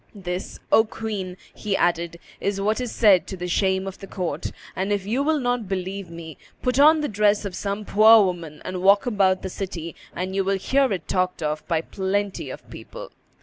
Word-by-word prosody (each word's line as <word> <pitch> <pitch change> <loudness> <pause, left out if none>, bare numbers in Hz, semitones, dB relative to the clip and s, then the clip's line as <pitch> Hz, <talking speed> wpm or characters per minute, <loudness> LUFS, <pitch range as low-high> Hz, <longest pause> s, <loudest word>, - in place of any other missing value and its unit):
This, 180 -2 -5
O 220 - +7
queen," 210 -5 -5 0.2
he 205 -2 -2
added, 170 -1 0 0.2
"is 200 0 -1
what 215 +4 0
is 245 -3 -3
said 195 -7 +4
to 190 - -6
the 180 0 -4
shame 190 +1 +1
of 195 -1 -7
the 195 - -9
court; 180 -3 -3 0.2
and, 195 +2 -2
if 200 -2 0
you 235 +7 0
will 310 +2 +2
not 245 -4 -1
believe 190 0 -4
me, 165 -2 -9 0.2
put 250 +1 +1
on 310 +2 +7
the 295 - 0
dress 210 -1 +2
of 195 - -4
some 200 +2 -3
poor 215 +1 +7
woman 170 -5 -5
and 185 -1 -4
walk 200 +2 +5
about 195 -5 +2
the - - -2
city, 175 -4 -6 0.2
and 185 +1 -3
you 195 - +2
will 195 +1 +1
hear 270 +6 +2
it 190 - -3
talked 185 -2 -1
of 150 0 -2
by 165 -3 +1
plenty 195 +3 -2
of - - -9
people." - - -9
195 Hz, 205 wpm, -24 LUFS, 180-215 Hz, 0.2 s, O